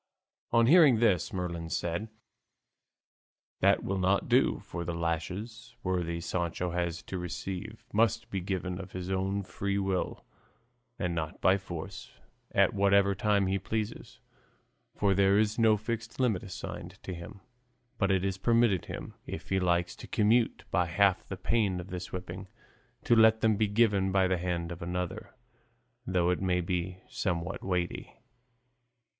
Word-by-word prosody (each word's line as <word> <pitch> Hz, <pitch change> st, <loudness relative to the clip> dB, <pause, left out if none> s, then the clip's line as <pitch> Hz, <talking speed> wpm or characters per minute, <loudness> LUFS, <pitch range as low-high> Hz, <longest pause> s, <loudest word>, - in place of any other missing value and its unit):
On 115 Hz, 0 st, +5 dB
hearing 150 Hz, -3 st, +7 dB
this 105 Hz, -6 st, +2 dB
Merlin 85 Hz, -3 st, -4 dB
said, 85 Hz, +7 st, -2 dB, 1.5 s
"That -, -, +3 dB
will 95 Hz, 0 st, -1 dB
not 95 Hz, +2 st, +2 dB
do, -, -, +3 dB
for 85 Hz, 0 st, -5 dB
the 85 Hz, 0 st, -3 dB
lashes 90 Hz, +8 st, -4 dB
worthy 85 Hz, -2 st, -1 dB
Sancho 85 Hz, 0 st, -2 dB
has 85 Hz, -1 st, -2 dB
to 95 Hz, -, -5 dB
receive 95 Hz, +5 st, -6 dB
must 115 Hz, +2 st, +1 dB
be 95 Hz, -, -2 dB
given 90 Hz, -1 st, -3 dB
of 95 Hz, 0 st, -9 dB
his 90 Hz, 0 st, -4 dB
own 95 Hz, +1 st, 0 dB
free 100 Hz, +1 st, -2 dB
will 95 Hz, -2 st, -2 dB, 0.7 s
and 90 Hz, -2 st, -1 dB
not 80 Hz, -2 st, -4 dB
by 95 Hz, -, +5 dB
force, 90 Hz, +1 st, -7 dB, 0.4 s
and -, -, +2 dB
at -, -, +1 dB
whatever 100 Hz, 0 st, +4 dB
time 100 Hz, 0 st, +2 dB
he 95 Hz, +1 st, 0 dB
pleases, 110 Hz, +3 st, -4 dB, 0.8 s
for 100 Hz, -2 st, +2 dB
there 100 Hz, +1 st, +4 dB
is 110 Hz, +1 st, +1 dB
no 110 Hz, -2 st, +5 dB
fixed 115 Hz, +2 st, -5 dB
limit 115 Hz, -8 st, +2 dB
assigned 95 Hz, -, -7 dB
to 95 Hz, -, -5 dB
him; 85 Hz, +3 st, -9 dB, 0.6 s
but 100 Hz, -, +2 dB
it 95 Hz, -1 st, +2 dB
is 95 Hz, -1 st, -2 dB
permitted 115 Hz, -4 st, +3 dB
him, -, -, -7 dB
if -, -, -7 dB
he 95 Hz, -, +2 dB
likes 85 Hz, -1 st, +1 dB
to -, -, -10 dB
commute 110 Hz, +3 st, +2 dB
by 90 Hz, -2 st, +2 dB
half 95 Hz, +2 st, +3 dB
the 95 Hz, -, -5 dB
pain 100 Hz, -2 st, +1 dB
of 90 Hz, +1 st, -8 dB
this 90 Hz, -1 st, -5 dB
whipping, 90 Hz, +1 st, -6 dB, 0.6 s
to 120 Hz, -, +4 dB
let 110 Hz, 0 st, +6 dB
them 110 Hz, -1 st, +4 dB
be 110 Hz, +1 st, +2 dB
given 100 Hz, -3 st, +2 dB
by 95 Hz, -1 st, +3 dB
the 95 Hz, -1 st, 0 dB
hand 85 Hz, -1 st, -2 dB
of 85 Hz, +1 st, -7 dB
another, 90 Hz, +1 st, -4 dB, 0.7 s
though 90 Hz, -1 st, +2 dB
it 90 Hz, -, -1 dB
may 90 Hz, -2 st, +1 dB
be 90 Hz, +1 st, -3 dB
somewhat 85 Hz, -3 st, -3 dB
weighty." 90 Hz, -2 st, -2 dB
95 Hz, 160 wpm, -30 LUFS, 90-105 Hz, 1.5 s, hearing